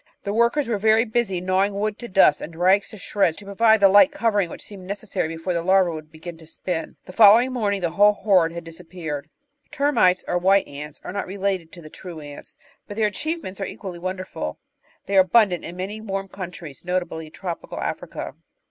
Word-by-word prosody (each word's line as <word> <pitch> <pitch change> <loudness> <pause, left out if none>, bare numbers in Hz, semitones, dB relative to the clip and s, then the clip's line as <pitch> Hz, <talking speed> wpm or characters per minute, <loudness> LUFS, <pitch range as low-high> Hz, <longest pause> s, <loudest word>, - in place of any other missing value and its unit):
The 200 - -3
workers 235 +5 +2
were 225 -3 -1
very 220 +2 +4
busy 215 -5 -1
gnawing 190 +2 +1
wood 210 +1 -2
to 240 - -7
dust, 190 -7 +4
and 165 - -8
rags 185 +4 +3
to 215 - -10
shreds, 185 -3 0
to 205 - -11
provide 220 +2 +3
the 200 - +8
light 205 +9 +6
covering 220 -10 +1
which - - -9
seemed 190 -3 -11
necessary 200 -4 -3
before 165 +3 -3
the 170 - -1
larvae 185 0 +3
would 155 -1 -8
begin 165 +1 -9
to 160 - -14
spin. 165 0 -4
The 185 - -11
following 225 +5 +6
morning 205 -5 -1
the 170 -2 -1
whole 205 +3 +5
horde 190 -5 +3
had 170 0 -7
disap 165 +1 -12
peared. 155 -5 -5 0.4
Termites 230 -11 +2
or 175 - 0
"White 195 +2 +3
Ants" 150 +1 -8
are - - -6
not 200 - -3
related 190 -3 -2
to 175 - -12
the 155 - -11
true 175 -4 -9
Ants, 145 -1 -11 0.3
but 205 - -8
their 220 - +2
achievements 210 - -3
are - - -1
equally 180 -4 -7
wonderful. 185 - -5 0.5
They 195 -1 +3
are - - +8
abun 210 +3 +4
dant 175 - -3
in 170 - -7
many 200 +4 -5
warm 195 -2 -4
countries, 175 -7 -8
notably 175 -3 -3
tropical 175 +1 -6
Africa. - - -5
190 Hz, 210 wpm, -23 LUFS, 170-205 Hz, 0.5 s, the